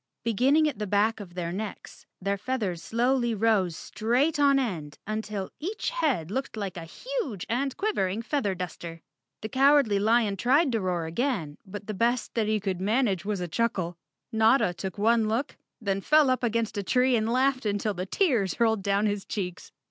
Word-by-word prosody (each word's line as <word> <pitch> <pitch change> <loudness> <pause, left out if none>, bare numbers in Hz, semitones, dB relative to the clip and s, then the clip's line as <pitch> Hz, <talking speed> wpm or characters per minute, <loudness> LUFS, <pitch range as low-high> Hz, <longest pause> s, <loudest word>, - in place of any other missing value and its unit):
Beginning 260 +8 +3
at 285 -8 -3
the 210 - -2
back 210 +3 +2
of 180 -4 -10
their 170 -2 -3
necks, 205 +2 -7
their 200 +1 -1
feathers 200 -6 -3
slowly 240 +5 +1
rose 200 -5 +2
straight 265 +8 0
on 280 -1 +5
end 170 - -3
until 215 -2 -4
each 405 +10 -3
head 275 - 0
looked 265 0 -3
like 195 -4 -4
a 170 - -6
huge 305 - -4
and 260 +3 -1
quivering 230 - -1
feather 230 -8 -1
duster. 170 -2 -6 0.4
The 220 - -5
Cowardly 270 -5 +4
Lion 220 -1 +2
tried 270 - +3
to 225 - +1
rpar 180 -4 -1
again, 170 - -2
but 205 +1 -7
the 215 - -4
best 235 +4 0
that 225 -3 0
he 215 0 +1
could 190 -3 -3
manage 205 -3 +1
was 205 -3 -2
a 175 - -2
chuckle. 185 -3 -1 0.4
Notta 220 -3 +4
took 185 +1 -6
one 225 +1 +3
look, 230 +7 -1 0.2
then 195 -3 -1
fell 300 +2 +4
up 255 - 0
against 230 -2 0
a - - -2
tree 250 +4 +3
and 220 0 0
laughed 255 -1 +1
until 205 +1 0
the 185 0 -4
tears 235 - +1
rolled 220 -3 +3
down 200 +2 +1
his 205 -2 -1
cheeks. 180 -4 -5
215 Hz, 185 wpm, -27 LUFS, 195-255 Hz, 0.4 s, on